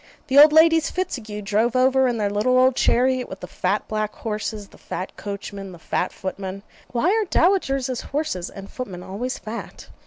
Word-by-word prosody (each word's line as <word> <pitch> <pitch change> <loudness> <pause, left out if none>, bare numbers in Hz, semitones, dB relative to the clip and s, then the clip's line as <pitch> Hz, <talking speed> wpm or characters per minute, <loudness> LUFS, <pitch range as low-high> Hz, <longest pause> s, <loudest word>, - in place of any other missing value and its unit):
The 270 +2 +6
old 300 +1 +9
Ladies 325 0 +5
Fitzague 225 - -4
drove 220 +4 +1
over 260 +1 +4
in 240 -2 0
their 205 -2 0
little 220 +5 +2
old 255 0 +4
chariot 255 +1 +2
with 190 - -8
the - - -5
fat 195 +3 -1
black 215 -1 -2
horses, 210 -1 -4
the - - -18
fat 185 - -6
coachman, 200 -1 -7
the - - -11
fat 175 +2 -2
footman 190 +1 -6 0.2
(why 255 +10 +1
are 440 0 +2
dowagers' 275 -10 +1
horses 285 - -3
and 195 0 -10
footmen 190 -8 -6
always 235 +8 -4
fat?) 225 +2 -8
230 Hz, 180 wpm, -23 LUFS, 200-265 Hz, 0.2 s, old